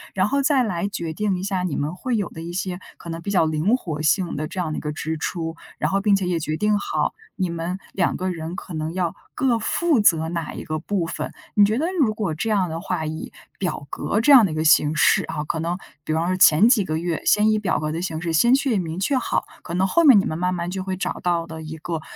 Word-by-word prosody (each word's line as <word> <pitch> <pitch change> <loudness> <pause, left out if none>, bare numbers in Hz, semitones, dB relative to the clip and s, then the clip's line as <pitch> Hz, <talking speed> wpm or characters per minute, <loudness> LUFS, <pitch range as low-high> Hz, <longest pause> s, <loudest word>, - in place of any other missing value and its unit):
然 190 +1 +2
后 280 +4 +1
再 275 -2 +3
来 190 -4 -1
决 170 -5 -4
定 200 +2 0
一 180 - -5
下 195 -2 -1
你 180 -5 -2
们 150 +3 -2
会 245 +6 -2
有 205 - -1
的 160 - -9
一 170 +1 -6
些 180 0 -3 0.2
可 170 - -10
能 165 0 -5
比 185 - -5
较 185 -5 +3
灵 160 +8 +2
活 155 - -5
性 165 +3 +1
的 155 +1 -3
这 185 - -6
样 170 -4 -1
的 - - -3
一 - - -9
个 150 - -3
支 160 +1 -3
出， 165 0 -3 0.2
然 - - -1
后 195 +1 +1
并 205 -1 +4
且 195 -2 -1
也 175 -2 0
决 155 0 -2
定 210 +1 +2
好 - - -1 0.2
你 185 -4 -1
们 170 +2 -3 0.2
两 180 - 0
个 185 +1 -2
人 165 0 -5
可 180 - -8
能 155 0 -3
要 180 -1 -1 0.2
各 250 -3 +2
负 315 +5 +1
责 160 -6 +3
哪 170 -2 -3
一 - - -7
个 155 0 -3
部 180 +1 -1
分。 - - -4 0.2
你 205 - +5
觉 215 +3 +3
得 305 - 0
如 235 -8 +3
果 205 -7 -2
这 160 +8 -3
样 195 -5 +1
的 165 +1 -4
话， 170 -3 -2
以 155 +1 -5 0.3
表 175 -6 -3
格 210 - -1
这 250 +6 +4
样 255 -6 +9
的 - - -5
一 - - -4
个 155 - 0
形 155 -1 +4
式 - - +4
啊， 150 - -4
可 160 +2 -3
能 170 +2 -2 0.3
比 - - -4
方 160 +2 +1
说 185 - +1
前 175 +3 +6
几 240 -4 +4
个 155 -3 -2
月 170 0 -2
先 210 +1 +4
以 215 - +2
表 205 -3 0
格 155 0 -2
的 165 +2 -3
形 165 -3 -3
式 165 0 -3
先 235 +11 +5
去 270 -6 +1
明 165 -1 -4
确 235 +9 +1
好， 255 - 0 0.2
可 170 - -6
能 185 +1 +2
后 335 - +3
面 265 -9 +8
你 195 - 0
们 155 - -2
慢 180 +1 0
慢 175 0 -3
就 190 0 -3
会 190 0 -3
找 190 - -3
到 170 -2 0
的 160 -1 -8
一 160 0 -7
个 165 0 -4
180 Hz, 300 characters per minute, -23 LUFS, 160-205 Hz, 0.3 s, 样